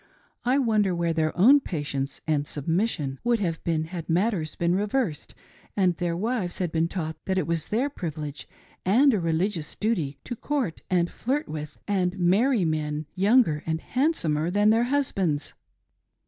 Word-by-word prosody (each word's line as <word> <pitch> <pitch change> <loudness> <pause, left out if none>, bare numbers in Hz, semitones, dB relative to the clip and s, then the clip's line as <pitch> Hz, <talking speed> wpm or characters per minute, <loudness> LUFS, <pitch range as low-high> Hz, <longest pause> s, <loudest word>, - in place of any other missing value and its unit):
I. 255 +3 +2
wonder 215 -8 +2
where 170 -1 0
their 160 0 0
own 255 +11 +7
patience 145 - -4
and 150 -2 0
submission 150 -3 -1
would 240 0 +3
have 170 -6 -2
been 160 -2 0
had 165 0 -7
matters 175 -2 0
been 170 0 +1
reversed 200 - -1 0.4
and 185 -3 +3
their 175 -2 -1
wives 210 -3 -1
had 180 -3 -2
been 165 0 +1
taught 160 -3 -4
that 190 -1 0
it 185 - +1
was 165 -2 -1
their 240 +6 +1
privilege 155 - -6 0.4
and 250 +9 +5
a 210 - +1
religious 165 0 -1
duty 175 -11 -1
to 240 - -5
court, 255 - -2
and 175 -2 +1
flirt 280 +6 -2
with 150 -1 -6
and 190 -2 0
marry 200 +5 +3
men 155 -1 -1
younger 195 -6 +3
and 160 0 0
handsomer 175 - 0
than 205 +3 +4
their 230 +2 +3
husbands 195 - 0
180 Hz, 160 wpm, -26 LUFS, 160-220 Hz, 0.4 s, own